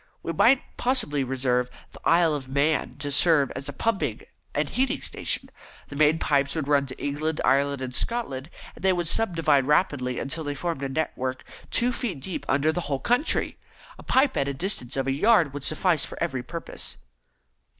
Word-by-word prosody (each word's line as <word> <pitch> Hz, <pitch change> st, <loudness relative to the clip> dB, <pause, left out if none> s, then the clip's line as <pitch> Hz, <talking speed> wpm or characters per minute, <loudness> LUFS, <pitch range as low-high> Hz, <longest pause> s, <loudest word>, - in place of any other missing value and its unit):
We 165 Hz, -, -3 dB
might 245 Hz, -, +5 dB
possibly 240 Hz, -, +1 dB
reserve 125 Hz, -1 st, 0 dB, 0.2 s
the -, -, -13 dB
Isle 165 Hz, -1 st, +4 dB
of 135 Hz, -3 st, -4 dB
Man 145 Hz, +3 st, +1 dB
to 145 Hz, 0 st, -4 dB
serve 145 Hz, 0 st, +4 dB
as 135 Hz, +2 st, -6 dB
a -, -, -2 dB
pumping 150 Hz, -, -1 dB, 0.3 s
and 150 Hz, 0 st, +1 dB
heating 260 Hz, -, 0 dB
station. -, -, -1 dB, 0.4 s
The 145 Hz, -, -8 dB
main 155 Hz, +2 st, +4 dB
pipes 140 Hz, -3 st, +1 dB
would 155 Hz, -4 st, -2 dB
run 140 Hz, -1 st, +3 dB
to 130 Hz, -, -7 dB
England, 150 Hz, +2 st, -2 dB
Ireland, 140 Hz, 0 st, +2 dB
and 125 Hz, -1 st, -5 dB
Scotland, 140 Hz, -, -2 dB, 0.2 s
where -, -, -15 dB
they 190 Hz, 0 st, +3 dB
would 175 Hz, -2 st, -1 dB
subdivide 165 Hz, -9 st, +2 dB
rapidly 145 Hz, -5 st, +1 dB
until 160 Hz, +4 st, -2 dB
they 145 Hz, -1 st, -3 dB
formed 165 Hz, -1 st, -3 dB
a 135 Hz, -, -2 dB
network 130 Hz, -3 st, -3 dB, 0.2 s
two 245 Hz, +2 st, +2 dB
feet 220 Hz, -, -3 dB
deep 175 Hz, +7 st, -6 dB
under 145 Hz, +4 st, +3 dB
the 175 Hz, -, -2 dB
whole 140 Hz, -4 st, -2 dB
country. 245 Hz, -, 0 dB, 0.4 s
A -, -, -8 dB
pipe 265 Hz, +1 st, +2 dB
at 140 Hz, 0 st, -1 dB
distances 140 Hz, -, -3 dB
of 135 Hz, -, 0 dB
a 135 Hz, -, +1 dB
yard 170 Hz, -2 st, +4 dB
would 145 Hz, -1 st, -5 dB
suffice 155 Hz, 0 st, +2 dB
for -, -, -8 dB
every 135 Hz, -7 st, -1 dB
purpose." 165 Hz, +7 st, -7 dB
145 Hz, 185 wpm, -26 LUFS, 135-170 Hz, 0.4 s, might